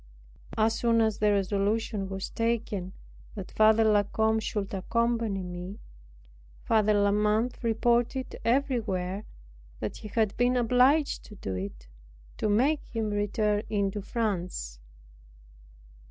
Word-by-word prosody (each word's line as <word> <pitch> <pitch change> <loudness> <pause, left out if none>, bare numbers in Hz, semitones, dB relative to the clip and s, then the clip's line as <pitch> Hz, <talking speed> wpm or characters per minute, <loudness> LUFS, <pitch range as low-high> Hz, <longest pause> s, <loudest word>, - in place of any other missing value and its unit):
As 220 0 +3
soon 230 -1 +3
as 220 -2 +1
the 210 0 +3
resolution 200 +1 0
was 190 0 -5
taken 225 -5 -2 0.4
that 195 -3 -7
Father 220 +1 +5
La 210 -1 +4
Combe 220 +2 +1
should 205 -2 -3
accompany 230 0 0
me, 180 +3 -7 0.8
Father 215 -1 +3
La 205 0 +3
Mothe 210 +4 +1
reported 235 +3 +1
everywhere 220 -7 0 0.5
"that - - -4
he - - -8
had 215 -1 0
been 245 +1 +3
obliged 250 +5 +3
to 210 - -12
do 95 - -5
it, 90 -11 -6 0.5
to 215 - 0
make 270 +9 +2
him 220 -2 -2
return 205 0 0
into 200 -1 -1
France." 180 - -3
215 Hz, 125 wpm, -28 LUFS, 195-230 Hz, 0.8 s, Father